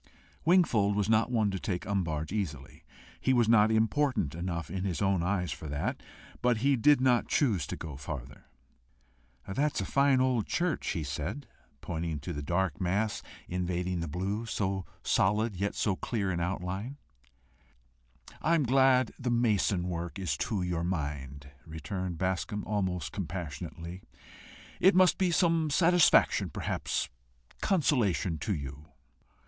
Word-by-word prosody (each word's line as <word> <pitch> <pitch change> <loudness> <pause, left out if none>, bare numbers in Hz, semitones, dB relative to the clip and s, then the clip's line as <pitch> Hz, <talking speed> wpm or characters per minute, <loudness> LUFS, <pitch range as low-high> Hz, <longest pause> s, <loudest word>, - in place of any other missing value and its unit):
Wingfold 120 - +4
was 105 -1 +1
not 110 +1 +3
one 110 -4 +1
to 95 - -3
take 90 -1 -3
umbrage 80 -6 -2
easily. 80 -10 -4 0.4
He 130 - +2
was 120 -3 +3
not 110 -1 +5
important 110 - +1
enough 85 -2 -4
in 95 0 -3
his 95 -4 -2
own 95 -3 +2
eyes 90 -2 -1
for 75 +2 -6
that, 75 0 -3 0.4
but 125 -2 +3
he 140 -1 +5
did 145 +4 +5
not 125 -2 +3
choose 105 - +1
to - - -4
go 80 -4 -7
farther. 65 -1 -7 1.0
"That's 140 +10 0
a - - -1
fine 140 -1 +3
old 130 -5 +1
church," 175 -2 -1
he 85 -5 -1
said, 75 - -4 0.4
pointing 80 -2 -3
to 85 - -5
the 75 - -4
dark 85 +2 -1
mass 100 +4 0 0.3
invading 90 0 -2
the 85 - -3
blue 100 +8 -3
so 95 -4 -2 0.2
solid, 105 +2 +2
yet 100 +3 -2
so 100 -4 +1
clear 100 -2 -2
in 85 - -2
outline. 95 +8 -3 1.4
"I 165 +2 +3
am 160 - +2
glad 130 -1 +4
the 125 -2 -2
mason 105 -6 +2
work 85 0 -4
is 90 -8 -1
to 100 +1 -1
your 85 -2 -1
mind," 70 -5 -4
returned 85 +4 -5
Bascombe, 95 +3 -2
almost 90 -7 -2
compassionately. 85 -1 -6 0.8
"It 190 +1 +5
must 185 -1 +5
be 185 -2 +3
some 165 -2 +2
satisfaction, 170 +2 +4
perhaps - - -2 0.5
consolation 115 - +1
to 100 +6 -1
you." 70 +1 -7
95 Hz, 145 wpm, -30 LUFS, 85-120 Hz, 1.4 s, not